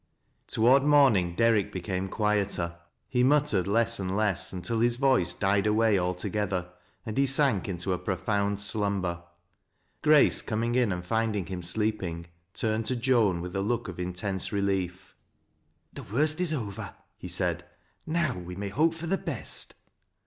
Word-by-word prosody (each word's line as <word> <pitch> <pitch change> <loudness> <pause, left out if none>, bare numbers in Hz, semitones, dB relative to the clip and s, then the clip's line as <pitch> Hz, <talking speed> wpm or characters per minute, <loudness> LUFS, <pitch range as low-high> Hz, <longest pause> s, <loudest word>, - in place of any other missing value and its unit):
Toward 125 +5 +4
morning 130 -12 +4
Derrick 115 -2 +2
became 95 +1 -3
quieter. 100 -6 -1 0.3
He 125 -1 +1
mut 145 +3 +4
tered 100 -11 0
less 115 +2 +1
and 95 +1 -2
less 105 -4 +1
until 95 +5 -3
his 120 +1 +3
voice 125 - +2
died 100 +1 +1
away 105 -1 +3
altogether, 90 0 -2 0.3
and 110 - -5
he 140 - +3
sank 135 -8 +3
into 90 +1 -2
a 90 - -2
profound 100 +1 -1
slumber. 100 -4 -1 0.8
Grace, 150 -2 +5
coming 115 +2 -2
in 125 -4 +2
ind 90 -1 -4
finding 110 -1 0
him 90 +1 -5
sleeping, 90 -3 -2 0.3
turned 110 0 -1
to 130 - 0
Joan 115 -8 +2
with 90 +2 -6
a 95 - 0
look 120 +3 -1
oi - - -4
iutouse 90 +2 -4
relief. 95 -2 -2 0.4
" 80 0 -44
The - - -8
worst 150 - 0
is 180 -3 +2
over," 110 -10 -5 0.2
he - - -9
said; - - -1 0.2
" - - -41
now 155 -7 +1
we 90 0 -7
may 100 +1 -4
hope 160 +10 +1
for 165 +1 -7
the 190 +3 0
best." - - -5
105 Hz, 165 wpm, -28 LUFS, 90-120 Hz, 0.8 s, Grace